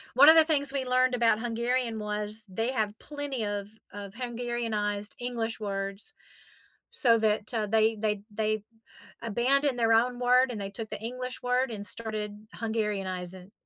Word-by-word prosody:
One 275 +3 +8
of 320 - +8
the 320 - +8
things 285 -3 +2
we 270 -2 -2
learned 255 0 +2
about 230 -3 +2
Hungarian 235 0 -1
was 210 +1 +3
they 225 +7 -2
have 215 -5 -1
plenty 285 -6 -4
of 205 -1 -4 0.2
of 200 -1 -8
Hungarianized 230 -4 -3
English 235 -2 -3
words 195 - -2 0.8
so 230 -3 +7
that, 215 +1 0
uh, 215 -2 -1
they 220 +1 +2
they 210 -1 -1
they 215 0 -1 0.6
abandoned 250 +4 +1
their 225 -1 +3
own 245 +2 +2
word, 250 +1 +3
and 215 -4 -5
they 195 - -4
took 220 +1 -7
the - - -6
English 250 +2 -5
word, 250 0 0
and 205 -2 -6
started 215 -2 -2 0.3
Hungarianizing. 195 -4 -3
225 Hz, 160 wpm, -28 LUFS, 210-250 Hz, 0.8 s, One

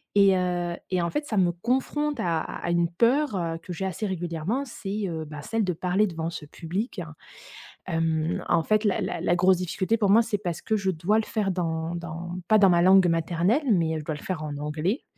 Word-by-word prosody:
et 195 -1 +6
heu 175 -1 -1
et 185 -2 +1
en 170 - 0
fait, 295 - -2
ça 220 - -3
me 180 -2 +4
confronte 260 - -1
à 165 -2 +1
à 175 - -4
une 170 -1 +2
peur, 240 - +2
heu, 165 -2 -2
que 180 - -7
j'ai 190 +3 -3
assez 190 +3 -3
régulièrement. 175 - -2
C'est, 210 -4 -5
heu, 160 -2 -4
bah, 150 -1 -8
celle 225 -1 -1
de 180 - 0
parler 185 +5 +1
devant 165 -2 -3
ce 160 - -7
public. 180 - -4 0.9
Hem, 165 -1 0
en 170 -2 +3
fait, 215 +3 +2
la 205 -3 +1
la 165 - -3
la 175 0 +2
grosse 185 +1 +4
difficulté 185 +4 -1
pour 205 -3 +1
moi, 225 +4 +6
c'est 220 -3 -2
parce 175 -5 -4
que 220 - 0
je 195 -2 0
dois 185 +6 +1
le - - 0
faire 205 -4 -1
dans 165 -1 -2
dans 170 +1 -6
pas 215 - +6
dans 200 -2 +6
ma 170 0 +4
langue 190 0 +6
maternelle, 175 - +1
mais, 165 -5 +2
heu, - - -2
je - - -7
dois 155 - -2
le 145 - -10
faire 180 -5 -3
en 145 -2 -5
anglais 155 - -2
180 Hz, 230 wpm, -26 LUFS, 165-210 Hz, 0.9 s, et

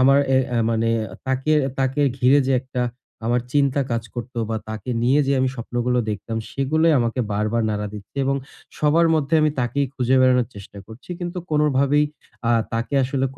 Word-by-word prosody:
আমার 135 +2 +6 0.5
মানে 115 0 +1 0.4
তাকে, 130 +3 0 0.3
তাকে 135 +2 0 0.2
ঘিরে 130 +3 +5
যে - - +3
একটা 130 -1 -3 0.4
আমার 120 +1 +2
চিন্তা 140 -1 +2
কাজ 115 -1 0
করতো 120 0 -6
বা 110 - 0
তাকে 110 +2 -5
নিয়ে 130 +5 +4
যে 140 - +2
আমি 130 - +2
স্বপ্নগুলো 120 +1 -1
দেখতাম 110 +2 -4
সেগুলোই 155 +4 +2
আমাকে 120 +1 0
বারবার 110 +3 0
নাড়া 105 0 -2
দিচ্ছে। 105 +5 -11
এবং 135 +1 +1 0.4
সবার 160 +3 +4
মধ্যে 155 0 0
আমি 155 0 +3
তাকেই 140 +3 0
খুঁজে 130 0 +2
বেড়ানোর 125 -2 +4
চেষ্টা 100 0 -11
করছি। 115 +10 -13
কিন্তু 175 +1 -4
কোনভাবেই 150 -1 +3 0.4
আ - - +3 0.2
তাকে 115 +5 -2
আসলে 135 0 -1
130 Hz, 165 wpm, -22 LUFS, 115-140 Hz, 0.5 s, আমার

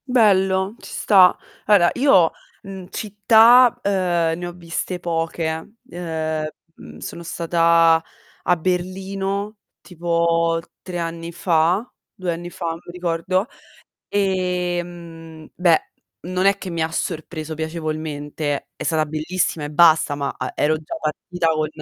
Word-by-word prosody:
Bello, 195 -4 +3
ci - - -11
sta. 190 -4 +5 0.3
Allora 195 -5 +5
io, 195 - +4 0.3
mhmm, 190 -2 -9
città, 225 +4 +5
uhm, 200 - +1 0.5
ne 175 0 -5
ho - - -5
viste 175 +1 -5
poche. 165 +2 -3
Uhm, 160 -3 -3 0.3
mhmm, - - -13
sono 170 - -7
stata 165 -1 +3 0.4
a 180 0 +2
Berlino 195 +4 -2 0.2
tipo 170 -1 0 0.2
3 180 -1 -6
anni 165 0 -4
fa, 175 +5 +1 0.3
2 180 -2 -3
anni 175 +1 -7
fa, 170 -1 -4
non 165 0 -5
mi - - -10
ricordo, 180 +2 -1 0.6
ehm, 175 -4 -3
beh 175 -3 +2 0.3
non 185 +2 0
è 195 0 +4
che 190 - -7
mi 165 -1 -2
ha 160 - -1
sorpreso 160 -1 -4
piacevolmente. 155 -2 -4
È - - -8
stata 160 -2 +1
bellissima 155 +1 -2
e 145 - -5
basta, 160 -2 +5
ma, 140 -1 -3
uhm, - - -3
ero 150 +1 +2
già 155 - -7
partita 165 +2 -2
con 155 -1 +1
170 Hz, 130 wpm, -21 LUFS, 160-185 Hz, 0.6 s, sta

